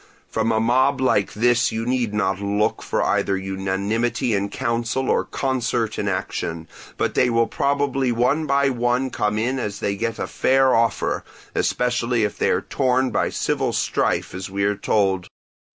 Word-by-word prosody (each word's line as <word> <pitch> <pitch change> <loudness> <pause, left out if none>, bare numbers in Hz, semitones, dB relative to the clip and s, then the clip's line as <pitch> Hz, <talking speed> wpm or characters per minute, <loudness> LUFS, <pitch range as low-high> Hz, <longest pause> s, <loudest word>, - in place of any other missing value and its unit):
From 110 +1 0
a 110 - +2
mob 130 +4 +2
like 115 -6 +1
this 120 +1 +2
you 115 +1 -3
need 125 -3 0
not 95 -2 -1
look 105 +2 0
for - - -1
either 95 - +1
unanimity 100 +6 -1
in 100 0 0
counsel 120 +2 -1
or - - +2
concert 120 -4 -1
in 105 - -1
action; 85 -3 -3 0.3
but - - 0
they 125 - +3
will 115 0 +3
probably 135 +1 0
one 125 +7 +1
by 140 0 +3
one 125 +1 0
come 105 -1 -1
in 125 +4 0
as 105 -4 -4
they 100 - -1
get 115 +2 -2
a - - -2
fair 135 0 +3
offer, 115 -2 +1 0.3
especially 120 -1 0
if 105 - -1
they - - 0
are - - +2
torn 130 -1 +1
by - - +1
civil - - -1
strife - - 0
as 95 +1 -6
we 100 +1 -2
are 100 +1 +2
told. 95 -3 0
115 Hz, 170 wpm, -22 LUFS, 100-125 Hz, 0.3 s, they